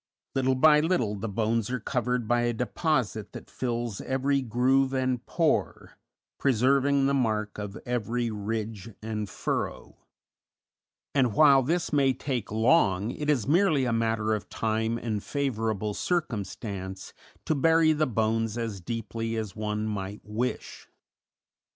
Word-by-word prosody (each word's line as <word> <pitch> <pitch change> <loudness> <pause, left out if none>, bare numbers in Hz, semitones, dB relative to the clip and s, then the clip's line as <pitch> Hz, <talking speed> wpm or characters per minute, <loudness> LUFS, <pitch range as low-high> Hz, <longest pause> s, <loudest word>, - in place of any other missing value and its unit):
Little 130 0 +2
by 150 +3 +6
little 150 - +1
the 105 +2 -4
bones 110 +1 0
are 130 0 -2
covered 125 -1 -1
by 120 +1 +2
a 120 0 +1
deposit 125 - -1
that - - -10
fills 120 -4 -3
every 135 +1 0
groove 130 +3 +2
and 130 -2 0
pore, 165 -3 -1 0.4
preserving 135 +2 +3
the 140 - +2
mark 110 -6 0
of 105 0 -5
every 120 0 -1
ridge 110 0 -4
and 105 -2 -3
furrow; - - -3 1.2
and 125 -7 +2
while 140 -1 +7
this 165 +5 -1
may 135 -2 +4
take 130 -4 -3
long, 110 - +3
it 150 +3 -4
is 135 -8 +2
merely 155 -4 +3
a 120 - 0
matter 110 -1 +1
of 105 -2 -4
time 110 +1 -1
and 110 -3 -3
favorable 110 -7 -1
circumstance 100 - -3 0.3
to - - +1
bury 160 +2 +4
the 155 0 +1
bones 115 -1 0
as 110 -5 -4
deeply 115 +3 -4
as 110 -3 -4
one 105 0 -2
might 100 -1 -4
wish. 115 +4 -4
115 Hz, 140 wpm, -27 LUFS, 110-135 Hz, 1.2 s, while